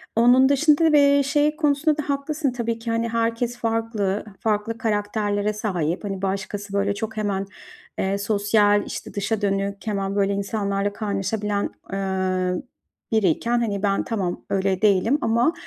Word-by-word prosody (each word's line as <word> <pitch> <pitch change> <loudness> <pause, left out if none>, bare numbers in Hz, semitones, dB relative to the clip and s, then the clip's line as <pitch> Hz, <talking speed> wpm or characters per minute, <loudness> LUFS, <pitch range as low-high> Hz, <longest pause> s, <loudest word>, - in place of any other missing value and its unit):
Onun 245 +4 +5
dışında 300 +3 +4
da 315 - +4
bir 280 -1 +5
şey 295 +2 +2
konusunda 300 0 +2
da 300 - -4
haklısın 280 0 -1
tabii 230 -2 -3
ki, 230 0 -4
hani, 230 0 0
herkes 230 +1 -1
farklı, 225 -4 -1
farklı 220 +1 -1
karakterlere 210 -1 -1
sahip, 180 -6 -2
hani, 195 -2 -4
başkası 195 +1 -3
böyle 200 0 +1
çok 220 +1 -5
hemen, 200 -2 -1 0.5
eee, 195 +1 0
sosyal, 205 0 +2
işte, - - -7
dışa 205 +2 -1
dönük, 200 +1 -1
hemen 195 -1 -1
böyle 200 0 +2
insanlarla 200 0 -1
kaynaşabilen, 205 0 -2 0.2
ııı, 185 -1 -1 0.5
biriyken, 220 +3 +2
hani, 205 -4 -2
ben 200 -1 +1
tamam 195 -6 -3
öyle 190 0 0
değilim 215 +6 +3
ama, 235 +8 +2
210 Hz, 145 wpm, -23 LUFS, 200-235 Hz, 0.5 s, Onun